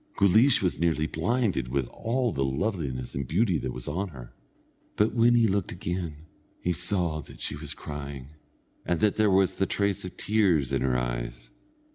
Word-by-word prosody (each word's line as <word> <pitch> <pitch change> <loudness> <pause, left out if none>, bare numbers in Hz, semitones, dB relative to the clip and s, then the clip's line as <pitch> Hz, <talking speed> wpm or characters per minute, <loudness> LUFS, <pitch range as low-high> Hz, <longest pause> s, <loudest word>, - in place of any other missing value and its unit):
Guleesh 110 +6 +5
was 90 -5 0
nearly 80 -2 +1
blinded 95 - 0
with 65 0 -1
all 120 +1 -1
the 70 - -1
loveliness 70 - -2
and 70 -1 -3
beauty 90 - +2
that 65 - -3
was 65 -1 -6
on 95 +8 -2
her; 65 -8 -11 0.6
but 105 +1 +2
when 120 +1 +5
he 115 -1 +5
looked 100 -2 0
again, 85 -3 -4 0.3
he 90 - 0
saw 85 -2 0
that - - -14
she - - -2
was 75 0 -6
crying, 70 -2 -7 0.5
and 85 0 0
that 105 -1 +2
there 110 -1 +4
was 95 -1 +3
the 95 - +1
trace 100 -1 0
of 90 -1 -8
tears 90 - +2
in 65 - +1
her 65 -2 +1
eyes. - - -4
85 Hz, 180 wpm, -27 LUFS, 70-100 Hz, 0.6 s, Guleesh